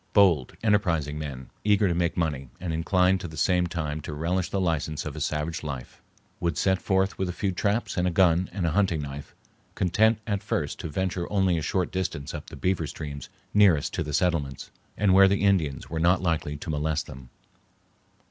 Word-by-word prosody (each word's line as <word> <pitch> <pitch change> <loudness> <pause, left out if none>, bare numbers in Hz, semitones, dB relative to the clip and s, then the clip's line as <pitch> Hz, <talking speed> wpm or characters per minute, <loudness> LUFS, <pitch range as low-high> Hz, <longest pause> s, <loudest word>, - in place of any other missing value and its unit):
Bold, 90 - +4
enterprising 85 -9 +1
men, 70 -4 -7
eager 105 -1 +3
to 90 - +1
make 85 0 0
money, 70 -6 -1
and 85 -2 -3
inclined 90 +3 +2
at 90 - -5
the 80 - -10
same 90 +3 +2
time 80 -3 -3
to 75 - -6
relish 85 +4 -1
the 100 - -1
license 80 -4 -1
of - - -5
a - - -6
savage 75 +2 -2
life, 70 -5 -7 0.4
would 85 0 -1
set 95 -1 +2
forth 95 0 +1
with 95 -1 0
a - - 0
few 95 +2 -1
traps 100 +5 -1
and 90 0 +2
a - - +3
gun 90 0 +3
and 90 -1 -2
a 85 - +1
hunting 90 -4 +1
knife, 70 0 -8 0.4
content 110 +5 +3
at 100 -3 -1
first 105 -8 -2
to - - -5
venture 90 +2 -2
only 95 -3 +2
a 80 - -1
short 90 +4 -1
distance 85 -6 -3
up - - -7
the - - -9
beaver 90 -4 0
streams 70 -3 -7 0.2
nearest 95 -8 +4
to - - -2
the 75 - -3
settlements, 75 -4 -1 0.3
and 100 -2 +3
where 95 +1 +8
the 100 +1 +1
Indians 85 -9 +1
were 80 - -2
not 90 +3 +4
likely 80 -4 -1
to 80 +3 -5
molest 75 +1 -1
them. 65 -2 -11
85 Hz, 205 wpm, -26 LUFS, 75-95 Hz, 0.4 s, where